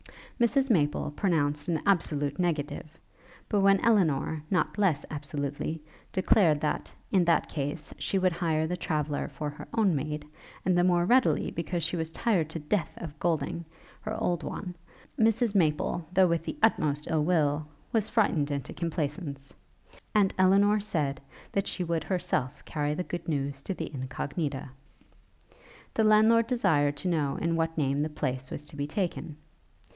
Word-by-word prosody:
Mrs 265 +2 +3
Maple 150 -6 +1
pronounced 150 -4 0
an 165 -3 +1
absolute 155 -6 +1
negative; 155 -2 -2 0.5
but 205 - +1
when 195 0 +5
Elinor, 160 -8 +2
not 190 +2 0
less 170 -8 +2
absolutely, 145 +1 -3 0.3
declared 185 -4 +4
that, 150 - -2 0.2
in 190 -2 +4
that 170 - +3
case, 145 +1 -4
she 195 - 0
would 185 -1 +3
hire 165 -2 0
the 175 +3 -2
traveller 150 -4 -2
for 150 -2 -5
her 145 - -10
own 205 -7 +3
maid; 150 +1 -3 0.4
and 185 0 +3
the 175 - +4
more 175 -1 +3
readily 250 +5 +3
because 170 +1 -2
she 170 - 0
was 160 -1 -3
tired 170 -4 +1
to 160 - -5
death 165 +4 -1
of 150 -3 -8
Golding, 165 0 -1 0.4
her 215 +1 -4
old 175 -1 0
one, 180 -3 -5 0.5
Mrs 225 0 +3
Maple, 165 -2 +1
though 190 0 +5
with 170 -2 +1
the - - -4
utmost 150 -9 +2
ill 155 -2 +1
will, 150 -3 +1 0.3
was 220 -2 +1
frightened 170 -10 +2
into 140 -1 -3
compliance; 150 -4 -3 0.6
and 200 -2 +4
Elinor 200 +3 +5
said 150 -9 -1 0.3
that 200 0 0
she 180 - -1
would 165 -2 -1
herself 175 -8 -2
carry 150 -1 -1
the 180 - -2
good 175 0 -6
news 140 -3 -2
to 195 - -4
the 160 -2 -5
Incognita. 135 +1 -4 1.2
The 220 - +2
landlord 220 +2 +5
desired 145 - +2
to - - -4
know 150 -5 +1
in 165 0 0
what 165 0 -1
name 140 -1 +1
the 155 - 0
place 130 -3 -3
was 150 - -6
to 150 - -9
be 145 0 -2
taken. 170 -3 -3
165 Hz, 160 wpm, -28 LUFS, 145-185 Hz, 1.2 s, when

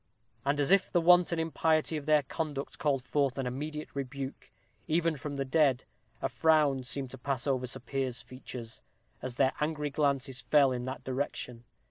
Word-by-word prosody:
And 140 +1 +1
as 145 +4 +2
if 195 -1 +4
the 175 - +4
wanton 175 0 +5
impiety 160 -1 +1
of 150 -1 -5
their 150 -1 +5
conduct 145 -1 -4
called 140 -4 +1
forth 140 0 0
an 135 - -1
immediate 150 +5 -5
rebuke, 135 0 -5 0.4
even 165 0 +2
from 145 0 -5
the 135 0 -1
dead, 135 -3 +3 0.4
a - - +3
frown 150 -5 +3
seemed 130 0 -2
to 130 - -9
pass 135 0 -2
over 130 -3 0
Sir 120 - -7
Piers's 130 -1 -3
features, 125 -3 -8 0.4
as 125 -1 -5
their 135 0 +3
angry 150 -1 -1
glances 140 -3 0
fell 140 -3 +4
in 125 -1 -3
that 130 +1 -5
direction. 125 -3 -3
140 Hz, 175 wpm, -31 LUFS, 130-155 Hz, 0.4 s, wanton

